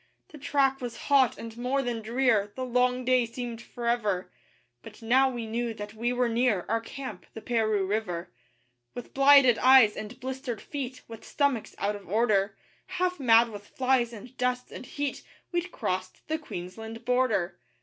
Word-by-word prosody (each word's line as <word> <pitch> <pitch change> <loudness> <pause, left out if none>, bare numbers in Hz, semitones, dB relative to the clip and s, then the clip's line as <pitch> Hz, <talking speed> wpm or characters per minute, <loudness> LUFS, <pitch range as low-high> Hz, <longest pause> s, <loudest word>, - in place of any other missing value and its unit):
The 300 - -12
track 270 -1 +1
was 245 -2 -5
hot 270 -3 +5
and 230 -1 -8
more 255 +3 -1
than 240 -2 -3
drear; 225 -3 +1
The 260 - -3
long 250 0 +1
day 255 -1 +3
seemed 235 0 -6
forever; 235 -6 -2 0.5
But 220 +1 -13
now 260 +4 +4
we 240 -3 -5
knew 230 +1 -2
that 210 0 -7
we 235 +2 -1
were 250 0 +1
near 230 -5 +1
Our 225 +1 0
camp 265 +3 -8
the - - -5
Paroo 220 -3 0
River. 190 -4 -3 0.6
With 245 - -8
blighted 275 -3 +6
eyes 255 -5 +7
and 215 +3 -7
blistered 260 -2 -5
feet, 260 -3 -6
With 225 -1 -10
stomachs 280 -6 -1
out 205 +1 -1
of 200 -3 -11
order, 210 -2 +2 0.3
Half 365 -1 -1
mad 235 -2 +5
with 205 -2 -10
flies 255 -2 +1
and 235 +3 -11
dust 250 0 -1
and 255 - -9
heat 285 -1 -3 0.3
We'd 350 0 -2
crossed 185 - -4
the 315 0 -1
Queensland 225 - -8
Border. 215 -9 +1
240 Hz, 170 wpm, -28 LUFS, 220-260 Hz, 0.6 s, eyes